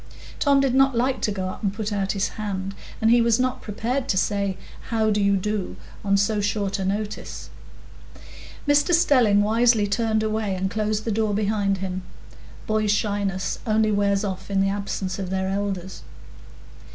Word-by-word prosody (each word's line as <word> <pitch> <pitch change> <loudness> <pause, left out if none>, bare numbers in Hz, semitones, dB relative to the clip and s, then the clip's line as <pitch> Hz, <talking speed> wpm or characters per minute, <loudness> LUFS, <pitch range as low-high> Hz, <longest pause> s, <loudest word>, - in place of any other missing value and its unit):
Tom 280 -1 +4
did 270 -2 +2
not 270 -2 +4
like 255 +2 +1
to 210 - 0
go 190 -2 -3
up - - -8
and 200 - 0
put 215 -1 -3
out 195 -1 0
his 200 0 0
hand, 195 -2 -4 0.3
and 220 +1 +3
he 240 0 +6
was 230 0 +3
not 255 0 0
prepared 245 +5 -2
to 190 - +2
say, 200 -1 0 0.3
"How 220 -2 +1
do 210 0 +1
you 200 0 +3
do?" 210 0 -2 0.3
on 200 -1 +3
so 205 +1 +1
short 200 -1 -1
a 190 - -2
notice. 205 +2 -4 1.2
Mr 290 +4 +4
Stelling 245 - +4
wisely 225 0 +3
turned 220 +1 0
away, 215 -2 -1
and 190 +1 -2
closed 215 0 -1
the 230 - 0
door 215 -1 0
behind 205 -1 +1
him; 185 0 -4 0.6
boys' 215 -1 0
shyness 200 -3 -1
only 215 0 +2
wears 200 0 +1
off 190 -2 -4
in 195 -1 +1
the 195 0 +2
absence 195 -1 -3
of 190 -2 -4
their 190 0 -1
elders. 195 -2 -3
205 Hz, 175 wpm, -24 LUFS, 195-220 Hz, 1.2 s, he